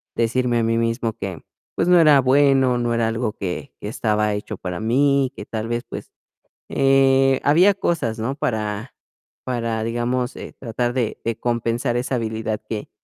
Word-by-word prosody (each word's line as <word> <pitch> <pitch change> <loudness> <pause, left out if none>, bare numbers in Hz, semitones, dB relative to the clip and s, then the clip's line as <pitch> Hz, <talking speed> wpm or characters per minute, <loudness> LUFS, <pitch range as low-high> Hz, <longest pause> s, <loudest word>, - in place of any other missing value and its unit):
decirme 120 +1 +1
a - - +1
mí 115 0 +1
mismo 115 -1 -1
que, 95 -5 -6 0.3
pues, 170 - 0
no 180 -1 +7
era 150 -4 +6
bueno, 135 -1 +4
no 120 -1 0
era 115 -1 +1
algo 115 -1 -2
que, 100 +8 -5
que 105 - -5
estaba 105 -3 0
hecho 105 +1 -5
para 90 -1 -5
mí, 135 +3 +2
que - - -8
tal 110 0 -4
vez, 120 +1 -2
pues, - - -9 0.6
eh, 135 -1 +3
había 175 +8 +5
cosas, 160 - -1
¿no? 130 +5 -2
Para 110 -2 -3 0.5
para, 115 -3 -2
digamos, 120 +2 -1
eh, - - -9
tratar 120 0 -2
de 120 -4 -2
de 115 -1 -2
compensar 120 +1 -1
esa 125 +1 -1
habilidad 110 -2 -2
que 105 -2 -5
120 Hz, 170 wpm, -22 LUFS, 110-135 Hz, 0.6 s, no